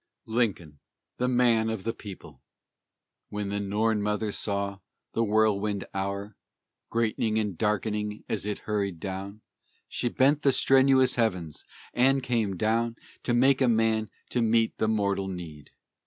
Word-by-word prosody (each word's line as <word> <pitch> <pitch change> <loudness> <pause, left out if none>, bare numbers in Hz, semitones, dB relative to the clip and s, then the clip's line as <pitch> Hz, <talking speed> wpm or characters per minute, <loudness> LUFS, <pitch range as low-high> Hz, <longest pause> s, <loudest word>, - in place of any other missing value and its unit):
LINCOLN, 100 - -1 0.4
THE 125 - 0
MAN 120 -3 +3
OF 110 -4 -3
THE 115 - -1
PEOPLE 100 -4 -11 0.9
When 105 -1 -3
the 100 0 -2
Norn 105 +2 0
Mother 105 +1 -1
saw 100 -1 -2 0.3
the 115 - +1
Whirlwind 105 -2 +1
Hour, 100 +1 -3 0.5
Greatening 110 -1 0
and 105 -4 -1
darkening 105 +1 -1
as 105 -1 -2
it 105 - -2
hurried 100 -5 -2
on, 100 +2 -5 0.5
She 120 - -1
bent 140 +5 +3
the 135 -3 +3
strenuous 130 -1 +4
heavens 90 -9 -2 0.3
and 135 +2 +3
came 115 -6 0
down 115 +4 +1 0.3
To 120 - 0
make 135 +2 +4
a 130 - +5
man 110 -2 +2 0.2
to 125 - +1
meet 115 0 +2
the 110 - +2
mortal 100 -3 0
need. 85 -6 -8
110 Hz, 140 wpm, -27 LUFS, 100-115 Hz, 0.9 s, a